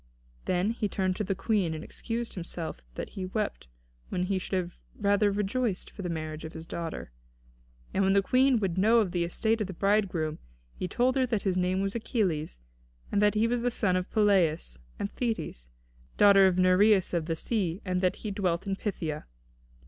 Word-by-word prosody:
Then 185 Hz, +4 st, +1 dB
he 225 Hz, -3 st, -2 dB
turned 185 Hz, -2 st, 0 dB
to -, -, -1 dB
the 195 Hz, -1 st, -1 dB
Queen, 195 Hz, -5 st, 0 dB
and 155 Hz, -, -6 dB
excused 235 Hz, 0 st, -4 dB
himself 170 Hz, -2 st, -5 dB
that -, -, -5 dB
he 185 Hz, -1 st, -5 dB
wept 205 Hz, -, -3 dB, 0.4 s
when 180 Hz, -, -1 dB
he 190 Hz, +1 st, 0 dB
should 185 Hz, -1 st, -2 dB, 0.2 s
rather 205 Hz, 0 st, +3 dB
have 200 Hz, -, -2 dB
rejoiced 210 Hz, 0 st, -1 dB
for 205 Hz, -, -9 dB
the 180 Hz, -, -3 dB
marriage 155 Hz, -1 st, -4 dB
of 160 Hz, -, -7 dB
his 160 Hz, 0 st, -8 dB
daughter. 165 Hz, -, -5 dB, 0.8 s
And 195 Hz, -, +2 dB
when 195 Hz, 0 st, +3 dB
the 200 Hz, 0 st, +4 dB
Queen 255 Hz, +3 st, +4 dB
would 190 Hz, -3 st, -1 dB
know 220 Hz, +4 st, +5 dB
of 210 Hz, -6 st, +2 dB
the 175 Hz, -1 st, 0 dB
estate 220 Hz, +6 st, 0 dB
of 210 Hz, -, -1 dB
the 190 Hz, -, -6 dB
bridegroom, 185 Hz, -5 st, +1 dB, 0.3 s
he 185 Hz, -, -4 dB
told 250 Hz, +7 st, +1 dB
her 260 Hz, -1 st, +2 dB
that 225 Hz, -4 st, -1 dB
his 190 Hz, -3 st, +1 dB
name 185 Hz, +1 st, +1 dB
was 195 Hz, 0 st, -1 dB
Achilles, 185 Hz, -, -1 dB, 0.5 s
and 205 Hz, -, +2 dB
that 210 Hz, 0 st, +4 dB
he 215 Hz, +2 st, +3 dB
was 240 Hz, +1 st, 0 dB
the 245 Hz, -, +1 dB
son 205 Hz, -6 st, +1 dB
of 185 Hz, 0 st, -1 dB
Peleus 175 Hz, -, +2 dB, 0.2 s
and 200 Hz, -, -3 dB
Thetis, 165 Hz, -, -3 dB, 0.5 s
daughter 200 Hz, -1 st, +7 dB
of 185 Hz, -1 st, +1 dB
Nereus 185 Hz, +2 st, +4 dB
of 165 Hz, -2 st, 0 dB
the 165 Hz, -, 0 dB
sea, 185 Hz, -1 st, -1 dB
and 180 Hz, -1 st, 0 dB
that 185 Hz, -1 st, +2 dB
he 210 Hz, -, -1 dB
dwelt 185 Hz, -3 st, -1 dB
in 195 Hz, -1 st, -1 dB
Phthia. 160 Hz, -8 st, -3 dB
195 Hz, 200 wpm, -29 LUFS, 175-210 Hz, 0.8 s, daughter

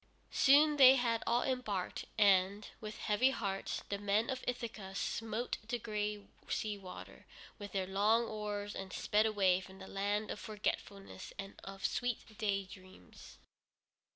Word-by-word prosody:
Soon 295 Hz, +2 st, +6 dB
they 265 Hz, -1 st, +10 dB
had 235 Hz, -3 st, +1 dB
all 240 Hz, +1 st, +3 dB
embarked, 220 Hz, -8 st, -2 dB
and, 200 Hz, 0 st, +4 dB
with 215 Hz, -1 st, -6 dB
heavy 215 Hz, +5 st, +3 dB
hearts, 200 Hz, -7 st, -3 dB
the 200 Hz, -, -2 dB
men 205 Hz, +4 st, +1 dB
of 260 Hz, -1 st, -4 dB
Ithaca 220 Hz, -6 st, -4 dB
smote 225 Hz, +4 st, -2 dB
the 240 Hz, -, -1 dB
gray 210 Hz, -2 st, -3 dB, 0.2 s
sea 215 Hz, -1 st, -1 dB
water 190 Hz, -2 st, -10 dB, 0.3 s
with 205 Hz, -1 st, -7 dB
their 190 Hz, -1 st, 0 dB
long 210 Hz, +5 st, +3 dB
oars, 210 Hz, -1 st, -4 dB
and 190 Hz, -1 st, -6 dB
sped 210 Hz, +3 st, +2 dB
away 190 Hz, -4 st, +3 dB
from 190 Hz, +1 st, -12 dB
the 190 Hz, -, -9 dB
land 205 Hz, +2 st, -1 dB
of -, -, -5 dB
forgetfulness 200 Hz, -2 st, -4 dB
and 195 Hz, 0 st, -6 dB
of 195 Hz, 0 st, -6 dB
sweet 245 Hz, -3 st, -2 dB
day 200 Hz, -2 st, +1 dB
dreams. 185 Hz, -, -14 dB
210 Hz, 150 wpm, -35 LUFS, 195-230 Hz, 0.3 s, they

